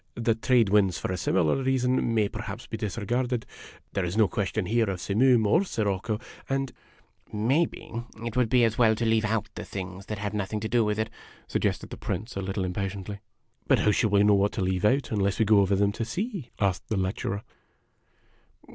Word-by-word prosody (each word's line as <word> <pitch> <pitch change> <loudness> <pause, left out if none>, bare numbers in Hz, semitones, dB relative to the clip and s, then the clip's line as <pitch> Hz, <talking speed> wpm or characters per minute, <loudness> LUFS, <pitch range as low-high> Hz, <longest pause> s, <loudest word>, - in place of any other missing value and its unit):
The 115 -1 +1
trade 115 -1 +3
winds 100 -3 +3
for - - -3
a - - -1
similar 90 -3 +1
reason 130 -2 +1
may 105 -2 +3
perhaps 105 +2 -6
be - - -6
disregarded. 115 +3 -2 0.5
There 100 - 0
is 90 +4 -2
no 110 -2 +5
question 100 -1 -2
here 115 +1 +1
of 95 -2 -3
simoom 115 +4 +3
or 165 - +4
sirocco, 105 - -1 0.3
and 135 -1 -1 0.2
" - - -33
" - - -30
Maybe 130 +11 0 0.3
it 115 0 -4
would 125 -3 +2
be 125 0 +4
as 115 0 +1
well 110 -2 +5
to 115 - -2
leave 110 -1 +2
out 110 -1 0
the - - -6
things 95 0 -7
that 105 - -4
have 105 +1 -3
nothing 105 +1 -2
to 110 - -2
do 120 +1 +3
with 105 0 0
it," 110 0 -2 0.4
suggested - - -1
the - - -6
Prince, 110 +4 -4
a 100 - -2
little 95 0 -2
impatiently. 100 +2 -4 0.2
" 115 +2 -39
But 135 - +5
how 105 - +4
shall 105 +2 +2
we 100 0 +4
know 105 0 +5
what 100 +1 +2
to - - -2
leave 95 0 0
out 135 +5 +2
unless 100 -2 +1
we 110 - +3
go 105 0 +5
over 100 0 +3
them 100 +1 +2
to 110 - -3
see? 180 - -4
" - - -33
asked 95 -3 0
the 110 - 0
lecturer. 95 +2 -2
105 Hz, 220 wpm, -27 LUFS, 100-115 Hz, 0.5 s, no